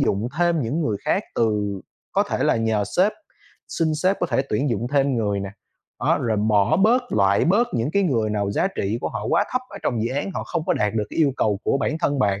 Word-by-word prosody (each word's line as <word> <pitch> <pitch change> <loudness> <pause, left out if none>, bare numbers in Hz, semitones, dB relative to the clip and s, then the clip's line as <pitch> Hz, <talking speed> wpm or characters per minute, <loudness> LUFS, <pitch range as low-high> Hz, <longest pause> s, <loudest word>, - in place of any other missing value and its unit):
dụng 105 +5 0
thêm 170 -2 +2
những 140 +9 -2
người 110 -9 0
khác - - +1
từ 105 -4 0 0.3
có - - +3
thể - - -3
là - - +3
nhờ 110 -2 0
sếp, 195 +4 +4 0.6
xin 160 -2 0
sếp 185 +6 +1
có - - +1
thể 135 - +1
tuyển 135 +6 0
dụng 115 +1 -1
thêm 135 -2 +2
người 100 -3 0
nè. 100 - -5 0.5
Đó, - - +2
rồi 110 -2 0
bỏ 105 +6 +2
bớt, 225 +7 +4
loại 100 0 +3
bớt 225 +8 +3
những 115 +6 0
cái 200 - +2
người 115 - +1
nào 100 -1 -1
giá 185 - +1
trị 105 +4 -1
của - - -2
họ - - -5
quá - - +3
thấp 255 - +1
ở 200 - -8
trong 115 -3 -1
dự 115 - -1
án, 145 +7 -2
họ - - -3
không 170 -3 -3
có - - +3
đạt 105 +1 0
được 105 -2 0
cái - - -7
yêu 145 -4 +3
cầu 105 -2 +1
của 140 - +1
bản 155 +2 -1
thân 145 -5 0
bạn, 100 -4 +1
115 Hz, 250 wpm, -23 LUFS, 105-160 Hz, 0.6 s, sếp